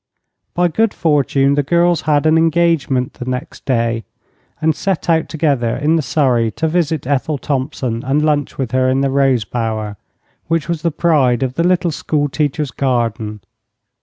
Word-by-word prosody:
By 175 0 +3
good 220 +6 0
fortune 140 -3 +2
the 145 - +2
girls 170 +3 +2
had 145 0 +2
an 155 0 +4
engagement 160 -6 +1
the 125 - -8
next 125 0 -5
day, 115 -3 0 0.6
and 155 -1 +1
set 190 -2 -2
out 160 -1 +1
together 140 -8 0
in 150 +4 +2
the 165 - +2
surrey 125 -6 +1
to 160 - -1
visit 160 -3 0
Ethel 140 +2 0
Thompson 130 -4 -2
and 145 +4 +1
lunch 145 -2 0
with 130 -4 -3
her 130 0 +2
in 130 +1 +1
the 135 -1 +1
rose 135 -5 +2
bower, 110 -2 -3 0.5
which 165 -2 0
was 170 -2 -2
the 170 - +1
pride 145 -7 +2
of 130 -1 -2
the 165 - 0
little 180 -1 +2
school 145 -1 -1
teacher's 145 -1 -1
garden. 115 -5 -2
140 Hz, 170 wpm, -17 LUFS, 125-160 Hz, 0.6 s, an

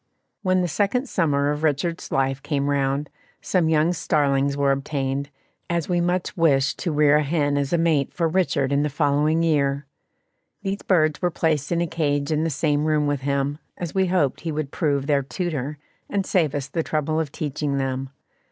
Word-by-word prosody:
When 185 -2 +2
the 180 - 0
second 205 - 0
summer 145 - +1
of 150 0 -3
Richard's 160 +2 -1
life 135 0 0
came 145 -1 -1
round, 140 +1 0 0.3
some 175 -4 +1
young 160 +2 +3
starlings 140 -3 +1
were 140 -1 +3
obtained, 135 0 -2 0.4
as 170 -2 -1
we 175 -1 +1
much 175 +1 -1
wished 140 -5 +2
to 175 - -1
rear 150 -1 +4
a 150 - +2
hen 145 -1 0
as 140 -1 -1
a 170 - +3
mate 160 -5 +2
for 170 -2 0
Richard 160 -6 +1
in 140 0 +2
the 150 - 0
following 150 +3 +2
year. 140 -3 +1 0.8
These 195 +1 -2
birds 155 -5 +2
were 180 - +2
placed 155 -3 0
in 170 0 +1
a - - +2
cage 145 -3 -1
in 155 0 +1
the 165 - 0
same 150 0 0
room 155 -1 +2
with 145 -2 -1
him, 140 +1 -1 0.2
as 175 -3 -5
we 190 -1 +2
hoped 175 -7 +1
he 165 0 -3
would 150 -2 -3
prove 140 -4 0
their 145 -1 +2
tutor, 150 -1 -3 0.3
and 200 -1 -1
save 160 -8 +1
us 140 -2 -3
the 165 +4 -2
trouble 155 0 -1
of 155 -3 -2
teaching 145 -1 -2
them. 135 0 -2
150 Hz, 195 wpm, -23 LUFS, 140-165 Hz, 0.8 s, rear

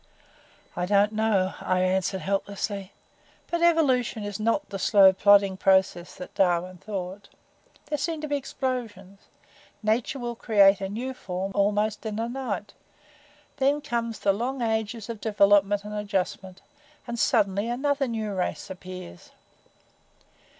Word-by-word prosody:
"I 180 0 -2
don't 205 +1 +3
know," 215 -4 +1
I 185 0 +1
answered, 190 +1 0
helplessly. 200 0 -3 0.6
"But 340 0 0
evolution 270 -10 +2
is 205 0 -5
not 230 +7 0
the 195 - -4
slow, 195 -1 +6
plodding 200 0 +4
process 190 -2 +2
that 180 - -9
Darwin 180 -1 +1
thought. 195 0 -6 0.6
There 295 - -3
seem 320 +3 -2
to 305 - -4
be 290 - 0
explosions 235 -8 -4 0.6
nature 225 +5 0
will 240 -2 -4
create 200 -4 +4
a 195 - -3
new 245 +6 -4
form 190 -4 -5
almost 210 +1 +1
in 215 -2 -4
a 225 +1 -1
night. 235 -6 -4 0.8
Then 280 +1 +2
comes 235 -6 -3
the 200 - +2
long 245 +5 -2
ages 220 -1 -2
of 225 -3 -7
development 205 -1 +3
and 210 0 -7
adjustment, 195 -2 -3 0.4
and 235 -1 -5
suddenly 200 0 +2
another 275 +2 0
new 220 -3 -3
race 185 0 -3
appears. 180 - -10
205 Hz, 135 wpm, -26 LUFS, 195-235 Hz, 0.8 s, slow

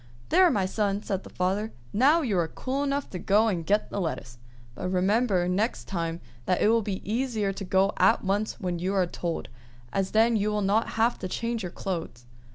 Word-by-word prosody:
"There, 370 0 +6
my 200 - +1
son!" 200 +1 -1
said 195 -2 -2
the - - -11
father. 195 +4 -1 0.2
"Now 290 +9 +4
you 225 -7 0
are 165 - +1
cool 265 +10 -3
enough 280 0 -1
to 180 - -5
go 210 +5 +3
and 180 -6 -1
get 205 +5 +1
the 200 - -2
lettuce; 125 -8 -4 0.3
but 180 - -4
remember 190 0 +2
next 205 +6 -1
time 165 -2 -3 0.3
that 180 - +2
it - - +4
will 230 0 +4
be 200 -3 -5
easier 220 -3 0
to 195 - -6
go 190 +2 +2
at - - +4
once 205 +4 -1
when 180 -4 -2
you 190 +3 -1
are 185 -2 +3
told, 170 -3 -4 0.4
as 195 -1 0
then 225 +2 +3
you 210 0 +1
will 210 -1 0
not 205 +4 +2
have 230 +2 +2
to 185 - -4
change 230 +4 -2
your 180 -3 -5
clothes." 165 -12 -5
200 Hz, 210 wpm, -27 LUFS, 180-225 Hz, 0.4 s, There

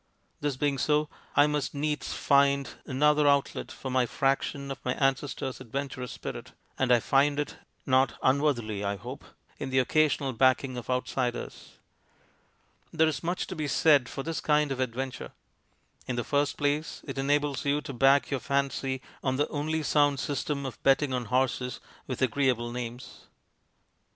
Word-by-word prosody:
This 145 -3 -2
being 140 -1 0
so, 150 0 +2 0.3
I 145 - +7
must 150 -1 -1
needs 150 +1 -2
find 140 -1 +3 0.2
another 150 +2 +3
outlet 140 -1 +1
for 130 - -6
my 125 -1 +2
fraction 140 +1 -1
of 135 - -7
my 125 - -1
ancestor's 135 -1 -1
adventurous 130 0 -5
spirit, - - -7 0.3
and 130 -2 +2
I 120 - +6
find 140 +4 +2
it, 145 - -3 0.3
not 130 -2 +3
unworthily 130 -7 +1
I 100 0 -1
hope, 100 - -8 0.4
in - - -4
the 130 - 0
occasional 140 0 +2
backing 130 +2 +2
of 125 0 -7
outsiders. 125 -1 -2 1.2
There 160 -1 +3
is 150 -4 -2
much 175 +2 -2
to 185 - -7
be 155 -2 -2
said 140 -2 +4
for 135 - -5
this 165 +1 -3
kind 150 -1 +2
of 130 - -3
adventure. 130 +1 -3 0.7
In 130 - -2
the 120 - -1
first 145 +2 0
place, 145 +2 -1
it - - -5
enables 145 -1 +1
you 145 +1 +1
to 140 -1 -7
back 135 +4 +4
your 135 - 0
fancy 135 -1 -1 0.2
on 130 -1 +1
the 145 +2 +1
only 155 +2 -2
sound 145 -2 +3
system 145 0 -2
of 130 -4 -7
betting 135 0 +3
on 125 -1 -1
horses 125 +1 0 0.3
with 130 0 -2
agreeable 125 -2 +1
names. 120 +1 -7
135 Hz, 160 wpm, -28 LUFS, 130-145 Hz, 1.2 s, I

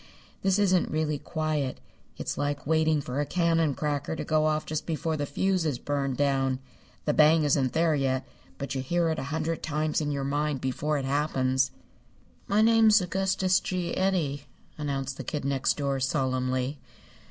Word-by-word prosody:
This 195 0 +2
isn't 185 -3 +3
really 155 -1 -1
quiet. 155 -5 -2 0.4
It's - - -3
like 145 -1 -2
waiting 160 0 +2
for 130 0 -4
a - - 0
cannon 165 -4 +2
cracker 150 +1 -2
to - - -4
go 155 0 +2
off 155 0 0
just 155 0 -4
before 160 -1 -1
the 145 -1 -2
fuse 185 +5 0
is 150 -6 -1
burned 140 -1 -2
down. 135 -2 +1 0.5
The 150 - +2
bang 155 +1 +5
isn't 140 -3 +2
there 165 0 +3
yet, 135 -2 0 0.3
but 140 -1 -4
you 135 - -2
hear 170 +5 +1
it 160 - -1
a - - -4
hundred 160 +1 -2
times 155 0 -1
in 145 - -1
your 140 -1 -2
mind 145 0 -1
before 145 +4 -1
it 135 - -3
happens." 135 -2 +1 0.8
"My 210 +2 +3
name's 225 -1 +6
Augustus 190 0 +1
G. 180 -2 -3
Eddy," 160 -8 0 0.3
announced 135 -3 -3
the - - -5
Kid 150 -4 -4
Next 140 -1 +1
Door, 140 -2 -1
solemnly. 130 0 -1
150 Hz, 175 wpm, -27 LUFS, 135-165 Hz, 0.8 s, name's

